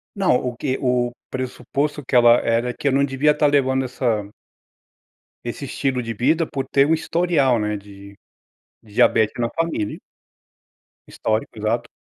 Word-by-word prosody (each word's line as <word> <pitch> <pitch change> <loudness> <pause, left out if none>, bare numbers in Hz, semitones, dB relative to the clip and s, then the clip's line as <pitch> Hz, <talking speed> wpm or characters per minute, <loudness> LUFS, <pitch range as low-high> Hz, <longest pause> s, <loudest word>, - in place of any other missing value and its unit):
Não, 195 -10 +2
o 125 -1 -2
que 130 +1 -2
o 125 -1 +1 0.2
pressuposto 135 +3 -3
que - - -2
ela 120 0 +7
era 120 +2 0
que 145 - -4
eu - - +3
não 140 +1 +3
devia 140 +2 +2
estar 150 0 +1
levando 130 -2 +2
essa 115 -5 -1 1.2
esse 120 +4 -5
estilo 130 -1 -1
de 115 -1 -4
vida, 155 +9 +1
por 135 -2 -4
ter 140 0 +3
um 160 - +3
historial, 160 -6 +1
né, 105 0 -1
de, 100 0 -13 0.7
de 105 -2 -18
diabete 110 0 +3
na 115 -1 0
família 165 -11 -2 1.1
Histórico 110 +2 -3
exato, 110 +3 -1
125 Hz, 155 wpm, -21 LUFS, 115-140 Hz, 1.2 s, ela